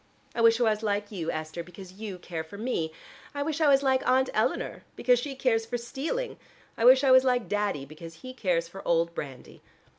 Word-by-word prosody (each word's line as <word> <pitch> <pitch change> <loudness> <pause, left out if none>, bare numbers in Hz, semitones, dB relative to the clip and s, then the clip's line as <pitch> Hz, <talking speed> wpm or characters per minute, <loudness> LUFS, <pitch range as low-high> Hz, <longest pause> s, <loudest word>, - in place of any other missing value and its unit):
I 235 - -1
wish 230 0 +5
I - - +3
was 215 -2 +2
like 205 -1 -1
you, 170 -6 -4
Esther, 155 +2 -4
because 180 +2 -12
you 200 -1 -7
care 170 -2 -5
for 160 +6 -11
me: 205 -8 -2 0.4
I 285 - -1
wish 320 +1 -2
I 310 - +5
was 275 0 +5
like 265 -1 +3
Aunt 260 +1 +3
Eleanor - - -1
because 245 -1 +3
she 275 +2 -5
cares 245 -4 +1
for 245 +1 -2
stealing. 295 - -4 0.4
I 230 - 0
wish 260 +2 +8
I 270 - +5
was 260 0 +8
like 250 -3 +1
Daddy 205 -9 -1
because 165 +3 -11
he 255 - -7
cares 175 -8 0
for 195 +3 -10
old 170 0 +2
brandy. 135 -6 -8
220 Hz, 215 wpm, -28 LUFS, 170-255 Hz, 0.4 s, wish